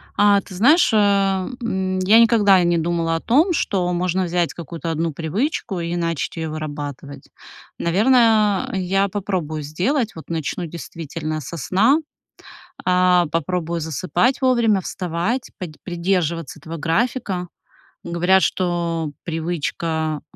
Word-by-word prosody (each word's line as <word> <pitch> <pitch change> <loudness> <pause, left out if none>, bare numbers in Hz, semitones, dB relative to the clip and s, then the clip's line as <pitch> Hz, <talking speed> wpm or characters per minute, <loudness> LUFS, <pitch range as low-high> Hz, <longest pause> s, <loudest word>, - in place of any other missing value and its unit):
А 205 -1 +4
ты 190 - -13
знаешь, 265 - +4
а, 195 -3 +2 0.2
м, 190 -4 -1
я 200 +5 +5
никогда 205 -5 +5
не 170 0 +2
думала 165 0 0
о - - -1
том, 295 - +3
что 190 - 0
можно 180 +1 0
взять 175 -1 0
какую-то 170 0 -6
1 165 +1 -1
привычку 190 - -2
и 170 0 -3
начать 165 -3 -2
её 160 -1 -3
вырабатывать. 145 -2 -7 0.5
Наверное, 215 +1 +3
я 195 +1 +1
попробую 185 -6 -3
сделать, 215 - -1
вот 160 - -11
начну 165 +1 -3
действительно 155 -1 -6
со 170 +5 -7
сна: 205 - +3 0.9
а, 180 -1 +4
попробую 170 +1 -1
засыпать 185 - 0
вовремя, 235 -6 +3
вставать, 180 +10 -3
подь 170 -6 -7
придерживаться 170 -4 -1
этого 160 +2 -7
графика. 180 - -1 0.5
Говорят, 180 +3 +2
что 170 -2 -1
привычка 160 -2 -2
175 Hz, 125 wpm, -21 LUFS, 165-200 Hz, 0.9 s, я